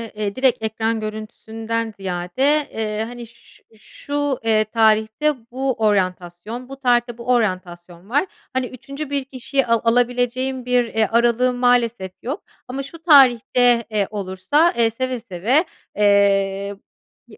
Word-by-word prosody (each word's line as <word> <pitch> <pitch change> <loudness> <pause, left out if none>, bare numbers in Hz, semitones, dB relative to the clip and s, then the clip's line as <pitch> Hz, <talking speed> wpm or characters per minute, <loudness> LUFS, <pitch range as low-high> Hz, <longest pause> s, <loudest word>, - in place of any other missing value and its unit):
eee, 210 -1 -3
direkt 260 -3 +1
ekran 220 +1 -1
görüntüsünden 220 +1 -5
ziyade, 195 +11 0
eee, 215 -1 -2
hani, 240 0 -9
"Şu 235 +1 -19
şu, 285 +5 -4
eee, 220 -1 +3
tarihte 220 +6 +2 0.2
bu 265 +1 -1
oryantasyon, 200 +2 -2
bu 270 - -7
tarihte 240 -2 +1
bu 235 - -10
oryantasyon 185 -5 -2
var. 285 +8 +2 0.3
Hani, 260 0 0
3'üncü 275 +4 -8
bir 280 -1 -1
kişiye 270 0 -1
a 230 -1 +2
alabileceğim 245 +2 0
bir, 250 0 +3
eee, 220 0 +2
aralığım 240 +2 +2
maalesef 240 -5 +1
yok 270 +6 -5 0.2
ama 265 +2 -4
şu 325 +4 -11
tarihte, 245 -5 +5
eee, 205 -2 0
olursa, 205 - +1
eee, 230 -1 +4
seve 255 +2 -3
seve, 230 - 0 0.3
eee, 200 -1 +2 0.5
bi - - -15
235 Hz, 135 wpm, -21 LUFS, 210-255 Hz, 0.5 s, tarihte